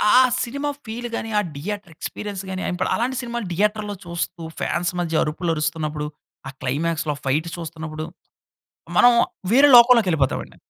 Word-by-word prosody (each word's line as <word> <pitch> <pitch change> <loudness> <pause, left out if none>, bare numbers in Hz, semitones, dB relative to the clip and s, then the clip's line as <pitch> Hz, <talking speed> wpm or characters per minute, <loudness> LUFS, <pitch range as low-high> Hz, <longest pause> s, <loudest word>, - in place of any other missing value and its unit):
ఆ - - +9 0.3
cinema 280 +4 -3 0.2
feel 235 +2 -5
గాని, 225 - -4
ఆ - - +2
థియేటర్ 195 +3 -5
ఎక్స్పీరియన్స్ 200 -2 -5
గాని, 190 0 -4
ఏంపడ్ 180 0 -1
అలాంటి 250 +3 -1
సినిమాలు 235 -3 -4
థియేటర్‌లో 210 +2 0
చూస్తూ, 170 0 -4 0.2
ఫ్యాన్స్ 175 0 -1
మధ్య 165 -2 +1
అరుపులు 165 +2 -1
అరుస్తున్నప్పుడు, 155 -1 -2 0.4
ఆ - - -5
క్లైమాక్స్‌లో 155 +3 -1
ఫైటు 155 +5 0
చూస్తున్నప్పుడు, 160 -2 -6 0.9
మనం 245 0 +8 0.4
వేరే 275 +4 +7
లోకంలోకెళిపోతామండి. 220 - +4
175 Hz, 135 wpm, -22 LUFS, 155-220 Hz, 0.9 s, ఆ